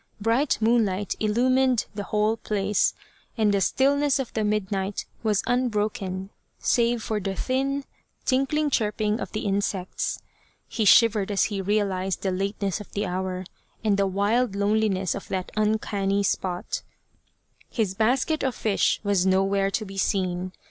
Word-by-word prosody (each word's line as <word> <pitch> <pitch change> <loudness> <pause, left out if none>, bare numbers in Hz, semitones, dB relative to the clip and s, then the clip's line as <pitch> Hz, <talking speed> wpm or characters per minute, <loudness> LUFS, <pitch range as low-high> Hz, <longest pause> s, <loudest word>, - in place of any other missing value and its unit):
Bright 230 +7 +2
moonlight 215 -4 +2
illumined 250 +2 +2
the 205 -1 -5
whole 215 +1 +1
place, 205 -2 0 0.4
and 215 -2 +3
the 200 - +2
stillness 280 +6 +2
of 270 -3 -4
the 220 - 0
midnight 200 -1 -1 0.2
was 210 -3 +1
unbroken 210 -5 -1 0.3
save 235 -1 +1
for 215 -1 -1
the 195 -1 -3
thin 270 +5 -1 0.4
tinkling 280 +3 +1
chirping 215 -1 0
of - - -5
the 215 - -3
insects. 195 -2 -1 0.5
He 220 - -1
shivered 215 -1 +5
as 200 -1 +2
he 195 - -1
realized 195 -2 -1
the 190 - +1
lateness 195 +1 -2
of 210 - -12
the 205 +1 -1
hour 185 0 -3 0.4
and 210 -2 +3
the 200 0 +2
wild 205 +4 +1
loneliness 200 -2 +1
of 200 - -7
that 185 -2 -3
uncanny 205 -2 +1
spot. 180 -2 -2 0.9
His 215 -6 -1
basket 255 - +1
of 260 -2 -1
fish 210 -3 +1
was 200 -3 +2
nowhere 195 +1 +2
to 215 +2 -2
be 195 0 -6
seen. 185 -2 0
210 Hz, 145 wpm, -25 LUFS, 195-230 Hz, 0.9 s, shivered